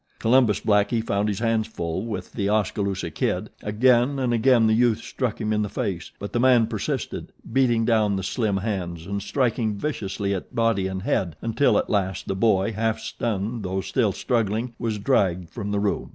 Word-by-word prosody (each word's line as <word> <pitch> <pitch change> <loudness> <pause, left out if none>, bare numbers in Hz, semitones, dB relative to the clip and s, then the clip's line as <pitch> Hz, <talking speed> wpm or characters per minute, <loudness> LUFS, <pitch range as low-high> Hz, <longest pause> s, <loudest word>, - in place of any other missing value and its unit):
Columbus 115 -3 +3
Blackie 110 +2 +2
found 100 0 0
his 100 - -2
hands 115 -1 +1
full 85 -5 -4
with 110 - -5
The 100 -3 -1
Oskaloosa 100 -4 -1
Kid. - - -2
Again 120 +5 +3
and 125 -3 0
again 120 0 +4
the 110 - +4
youth 115 -1 +3
struck 125 -5 -3
him 110 -1 -1
in 105 - +1
the 105 - -2
face; 90 -3 -3
but 100 - -7
the 120 - +1
man 125 -2 +5
persisted, 110 -2 -4 0.2
beating 120 -4 +3
down 110 -3 +2
the 95 - -3
slim 105 +1 0
hands 90 -5 -3
and 100 +1 -3
striking 110 0 0
viciously 100 -7 -2
at 95 +6 -6
body 115 -5 +2
and 95 0 -4
head 85 -6 0
until, 115 +5 +2
at - - 0
last, 95 -2 -1
the 95 - -1
boy, 100 0 +2
half 110 +1 0
stunned 110 +1 -3
though 95 0 -2
still 115 0 +1
struggling, 115 +3 -1
was 115 -3 -1
dragged 95 - +1
from 105 +1 -5
the 100 0 0
room. 100 0 -1
105 Hz, 190 wpm, -24 LUFS, 100-115 Hz, 0.2 s, man